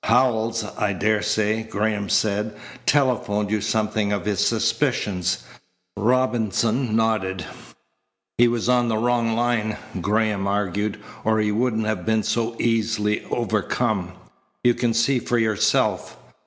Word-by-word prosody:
"Howells, 115 -2 +2 0.2
I 105 -1 +1
daresay," 105 +2 +1
Graham 105 -1 -2
said, 105 0 0 0.3
"telephoned 110 -7 +1
you 110 -1 +1
something 105 0 0
of 100 -1 -2
his 105 -3 -1
suspicions." 90 -2 0 0.5
Robinson 115 0 +1
nodded. 100 -6 0 0.9
"He 120 - +7
was 120 -1 -1
on 125 -1 +3
the 110 -1 0
wrong 115 0 +1
line," 115 -2 0 0.2
Graham 105 0 0
argued, 105 +1 -1 0.2
"or 110 0 +2
he 105 -1 +1
wouldn't 110 0 0
have 105 -5 -2
been 110 +1 +1
so 115 0 -1
easily 110 -2 0
overcome. 90 -4 -1 0.5
You 120 - +5
can 120 -1 0
see 125 +3 +2
for 120 +1 -1
yourself. 110 -3 +1
110 Hz, 125 wpm, -23 LUFS, 105-115 Hz, 0.9 s, He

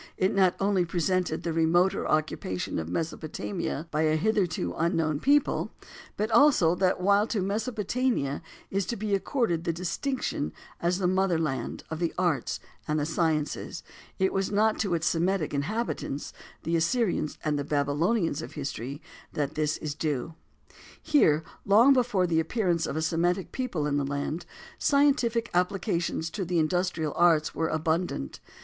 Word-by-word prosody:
It 185 - +2
not 190 -2 +3
only 195 -2 +2
presented 175 -1 0
the 170 - -2
remoter 170 +3 +2
occupation 155 - -1
of 80 0 -5
Mesopotamia 160 - -3
by 150 - 0
a 155 0 +3
hitherto 175 - 0
unknown 165 -3 0
people, 285 - +2 0.4
but 215 +2 -1
also 230 - +5
that 185 0 +1
while 200 +3 +3
to 220 - -1
Mesopotamia 215 - -1 0.3
is 195 -1 0
to 235 - -2
be 210 -1 -2
accorded 195 - 0
the 170 - 0
distinction 185 - -2 0.3
as 175 +1 +1
the 190 - -1
"mother 185 -1 +2
land" 155 -5 -3
of 160 - -3
the 170 -2 -1
arts 175 -5 0 0.3
and 150 -1 0
sciences, 160 -2 -1 0.3
it 190 0 +1
was 195 0 0
not 215 +2 +2
to 195 -5 +1
its 165 0 -2
Semitic 175 -1 +1
inhabitants, 150 -1 -3 0.3
the 165 - 0
Assyrians 170 -1 0
and 150 -2 0
Babylonians 155 +4 +1
of - - -8
history, 140 -1 -5 0.3
that 145 -2 -1
this 155 0 0
is 150 -2 -4
due. 150 0 -2 0.7
Here, 160 - +3 0.2
long 225 +7 +6
before 240 -8 +2
the 165 -2 +2
appearance 175 -2 0
of - - -4
a 160 - -1
Semitic 175 +3 0
people 235 - -2
in 145 -1 0
the 145 - +1
land, 140 +4 -3 0.3
scientific 270 -5 +2
applications 180 -3 0
to 200 - -3
the 175 0 -1
industrial 165 -1 0
arts 165 -3 +3
were 160 +2 0
abundant. 160 - -1
175 Hz, 150 wpm, -28 LUFS, 155-200 Hz, 0.7 s, long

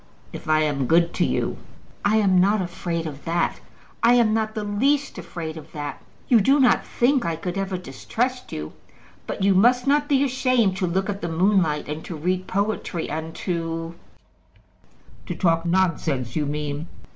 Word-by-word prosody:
"If - - -8
I 155 0 +4
am 140 -4 0
good 170 +2 +3
to - - +1
you." - - -1 0.5
"I 205 +2 +3
am 190 -4 +4
not 205 +3 +3
afraid 175 -2 -3
of 145 -2 -7
that; 170 +1 0 0.4
I 235 +1 +5
am 230 -3 +4
not 220 0 -1
the 215 - -2
least 275 +8 0
afraid 160 -2 -6
of 155 0 -12
that. 145 -2 -5 0.3
You 235 -4 +5
do 275 +8 +4
not 255 -3 +4
think 265 +2 +2
that 170 - -1
I 165 - -1
could 175 +2 -5
ever 195 -1 -2
distrust 240 - -3
you? 75 0 -6 0.5
But - - -3
you 195 0 +5
must 245 +6 +4
not 290 +1 +2
be 275 -1 +4
ashamed 255 -6 +2
to 185 - 0
look 190 +3 0
at 205 -1 -4
the 170 - -3
moonlight, 165 -3 +2
and 150 +2 -5
to 175 - -6
read 180 +4 -1
poetry, 200 -4 -2
and 160 +1 -4
to 165 -2 -2 0.6
" - - -29
"To - - -3
talk 165 -2 +1
nonsense, 165 -8 0
you 150 -2 0
mean." 150 +1 -3
185 Hz, 185 wpm, -23 LUFS, 160-220 Hz, 0.6 s, I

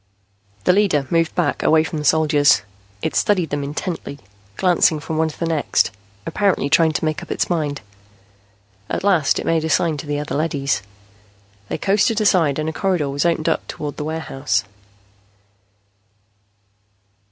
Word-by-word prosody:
The 180 - +4
leader 185 -8 +2
moved 165 -1 +1
back, 175 -5 0
away 155 0 +4
from 160 -1 -4
the 150 - -5
soldiers. 145 -2 +4 0.4
It - - -2
studied 180 -7 +1
them 145 0 -2
intently, 145 +1 -5 0.4
glancing 175 -3 +3
from 155 +2 -4
one 160 - +2
to 150 - -12
the 170 - -1
next, 160 -3 +1 0.3
apparently 195 -8 0
trying 160 +1 +4
to 155 - -1
make 155 -1 -1
up - - -11
its - - -1
mind. 150 -4 -1 1.1
At - - -2
last 175 -8 +3
it - - -3
made 165 -1 +1
a 160 - -2
sign 160 0 +1
to 145 - -7
the 145 0 -1
other 150 - -5
leadys. 145 -6 -1 0.9
They - - -2
coasted 205 +3 +2
aside 175 -9 +3
and 155 0 -2
a 160 - -2
corridor 180 -7 0
was 145 +4 +1
opened 165 -2 0
up - - 0
toward 145 -1 -6
the - - -3
warehouse. 145 -8 -2
160 Hz, 165 wpm, -20 LUFS, 145-170 Hz, 1.1 s, The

